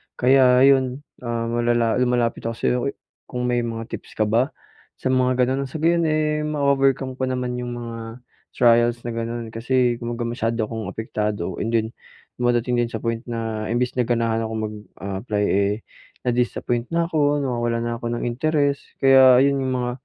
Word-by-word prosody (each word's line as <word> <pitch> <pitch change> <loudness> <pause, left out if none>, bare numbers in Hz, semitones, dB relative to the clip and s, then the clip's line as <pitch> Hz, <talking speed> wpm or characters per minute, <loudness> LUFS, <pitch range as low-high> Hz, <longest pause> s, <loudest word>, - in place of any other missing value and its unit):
Kaya 130 0 +5
ayun, 135 0 +3 0.2
ah, 115 -1 -3
malala 120 0 +1
lumalapit 120 -2 0
ako 115 - -3
sa'yo, 125 - 0 0.5
kung 125 -1 -4
may 125 0 +1
mga 115 -1 -4
tips - - -8
ka 110 - +2
ba 115 +7 +1 0.4
sa 130 - -2
mga 130 0 +2
ganun? 135 0 -1
Sa 155 +4 -7
gayon 170 -1 +3
eh, 150 0 0
ma-overcome 135 -3 +1
ko 130 - 0
naman 125 -1 -2
yung 120 0 -4
mga 115 0 -7 0.3
trials 120 0 +3
na 120 - -4
ganun. 115 0 -4
Kasi 120 +1 +1
kumbaga 120 0 -4
masyado 115 -1 -1
akong 110 -2 -5
apektado 105 -3 -3
and 115 +2 -1
then 110 -1 +2 0.5
dumadating 120 0 +1
din 120 - +1
sa - - -6
point 115 -1 -1
na 110 -2 -3
imbes 120 +2 0
na 120 - +1
ganahan 115 -2 +1
akong 110 0 -3
mag, 105 0 -4 0.2
ah, 100 0 -5
apply 105 -4 -1
eh, 100 +1 +2 0.5
na-disappoint 120 0 0
na 170 0 +2
ako, 145 -3 +2
nawawalan 120 -2 -1
na 120 0 -2
ako 120 0 -3
ng - - -4
interes, 140 +3 +1 0.2
kaya 130 -1 +7
yun 140 0 +2
yung 130 -1 -1
mga, 125 -1 -1
120 Hz, 175 wpm, -22 LUFS, 115-130 Hz, 0.5 s, kaya